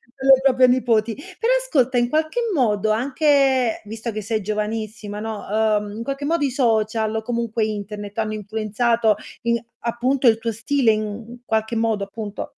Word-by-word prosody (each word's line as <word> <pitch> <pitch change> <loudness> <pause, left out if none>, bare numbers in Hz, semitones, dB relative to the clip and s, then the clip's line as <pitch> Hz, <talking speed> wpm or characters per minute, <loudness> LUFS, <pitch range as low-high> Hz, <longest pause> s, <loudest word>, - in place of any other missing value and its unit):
per 265 - -7
le 265 -1 +7
proprie 255 -1 +5
nipoti. 230 -3 +2
Però 455 - -3
ascolta 265 - +1
in 240 0 +2
qualche 315 +8 0
modo 215 - +1
anche 265 0 +2
visto 225 +2 -5
che 215 0 -4
sei 220 +1 -2
giovanissima, 210 0 -4
no, 220 -1 -5
uhm, 210 -1 +1
in 230 - -4
qualche 275 +2 -4
modo 315 -1 +1
i 265 - -1
social 220 -3 +1
o 220 - -1
comunque 230 -1 -1
internet 205 0 -6
hanno 215 -1 -1
influenzato 220 +1 0 0.3
i 235 -1 +1 0.2
appunto 250 +3 +1
il 225 -1 +6
tuo 230 0 -2
stile 230 +2 +2
in 215 +3 -4
qualche 220 +1 -1
modo 225 -2 0
appunto? 210 0 -7
225 Hz, 165 wpm, -22 LUFS, 215-255 Hz, 0.3 s, le